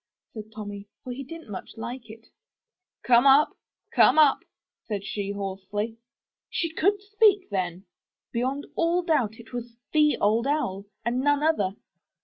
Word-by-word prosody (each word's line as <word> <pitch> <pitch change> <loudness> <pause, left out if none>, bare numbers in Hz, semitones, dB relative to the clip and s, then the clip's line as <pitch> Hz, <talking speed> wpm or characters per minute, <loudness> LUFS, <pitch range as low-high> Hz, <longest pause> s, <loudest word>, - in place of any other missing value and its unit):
said 215 -2 -7
Tommy, 205 -2 -7 0.2
for 250 - -5
he 275 +3 -6
didn*t 320 -3 -10
much 190 - -8
like 235 +1 -6
it. 225 +1 -12 0.8
'*Come 240 +2 +5
up, 275 +3 +6 0.4
come - - +6
up!*' 300 -3 +6 0.5
said 200 -3 -3
she 200 -1 -3
hoarsely. 200 +3 -4 0.5
She 335 -2 -2
could 400 +5 +2
speak 410 - +3
then! 185 -1 -2 0.5
Beyond 260 +4 -1
all 340 +2 +2
doubt 275 - +1
it 235 +1 -15
was 240 -1 -6 0.2
the 300 -1 +4
Old 225 +5 +2
Owl, 200 -10 -1 0.2
and 240 +2 0
none 290 +2 +2
other. 205 -12 +1
240 Hz, 145 wpm, -26 LUFS, 205-300 Hz, 0.8 s, up